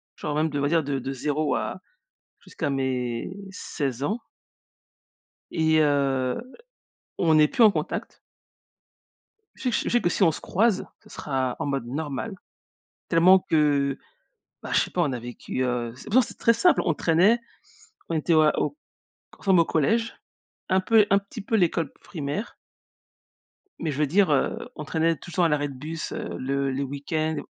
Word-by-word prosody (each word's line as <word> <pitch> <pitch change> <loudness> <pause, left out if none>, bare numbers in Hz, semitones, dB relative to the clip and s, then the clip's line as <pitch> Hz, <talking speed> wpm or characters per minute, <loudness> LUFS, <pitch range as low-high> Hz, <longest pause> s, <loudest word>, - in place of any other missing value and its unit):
genre 150 -1 -4
même, 155 +1 +2
je - - -6
devrais 145 0 0
dire, 165 -1 +2
de 140 -1 -2
de 135 +2 -4
0 150 +3 -1
à - - -3 0.6
jusqu'à 145 - -4
mes 125 0 -2 0.2
16 140 -8 -4
ans 220 +10 -1 1.3
et 160 -1 +3
heu, 135 - +1 0.8
on 160 -3 +4
est 150 - +6
plus 240 - +3
en 215 - +8
contact. 155 -4 -4 1.4
Je - - -13
sais 250 - +1
que - - +1
je - - -1
sais 240 - +3
que, 175 - +1
si 195 - -1
on 165 -3 +5
se - - -7
croise, 205 +1 +1 0.2
ce - - -19
sera 130 -3 -2
en - - -3
mode 135 -4 -2
normal, 150 - -4 0.8
tellement 180 +3 +6
que, 145 -5 +1 0.7
bah, - - -7
je - - +4
sais - - -2
pas, 180 - 0
on 145 -5 0
a 125 - -3
vécu, 120 +2 -5
heu, 120 -2 -2
c'est - - -12
pourtant, 250 +4 +4
c'est - - -9
très 230 - +4
simple. 350 +10 +4
On 165 -4 +1
traînait, 185 +11 +3 0.7
on 165 - -1
était 160 +2 +1
à 155 -1 +4
au - - -1 0.6
ensemble 190 -4 +4
au - - +5
collège, 225 +11 +1 0.6
un 190 - +4
peu 210 +3 +5
un 200 - +6
petit 200 +2 -9
peu 220 +3 -1
l'école 170 -6 +1
primaire 160 +6 -5 1.2
mais 165 - -2
je 140 - -6
veux 150 - +3
dire, 190 +4 +3
heu, 145 - +2 0.2
on 150 - -6
traînait 165 +2 +1
tous 175 - -12
le - - -8
temps 180 - +4
à - - +4
l'arrêt 145 -1 0
de 140 - -9
bus, 155 +5 -6
heu, - - -5
le 135 +1 -1
les 135 +2 -2
week-ends, 155 +3 -2
155 Hz, 185 wpm, -25 LUFS, 140-180 Hz, 1.4 s, en